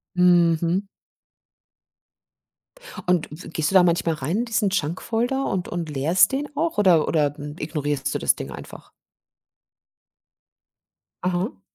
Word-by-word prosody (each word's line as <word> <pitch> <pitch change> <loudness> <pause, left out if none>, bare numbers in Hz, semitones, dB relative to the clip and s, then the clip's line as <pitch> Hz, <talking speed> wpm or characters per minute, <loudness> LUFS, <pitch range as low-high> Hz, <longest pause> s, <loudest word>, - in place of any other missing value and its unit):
Mhm. 175 0 +3 2.2
Und 180 -3 +2
w 155 +4 -10
gehst 160 -1 -1
du 195 - -4
da 185 - +8
manchmal 170 -2 +1
rein 155 +9 -2
in 240 - 0
diesen 215 -3 0
Junk-Folder 225 - -1
und 185 -2 -2
und 170 -2 -4
leerst 160 +8 +3
den 285 +2 -2
auch 325 -6 -1
oder 180 -6 +4
oder 145 -3 +1
ignorierst 145 -1 -3
du - - 0
das - - +3
Ding - - -6
einfach? - - -11 2.3
Aha. 180 +3 -2
175 Hz, 125 wpm, -23 LUFS, 155-195 Hz, 2.3 s, da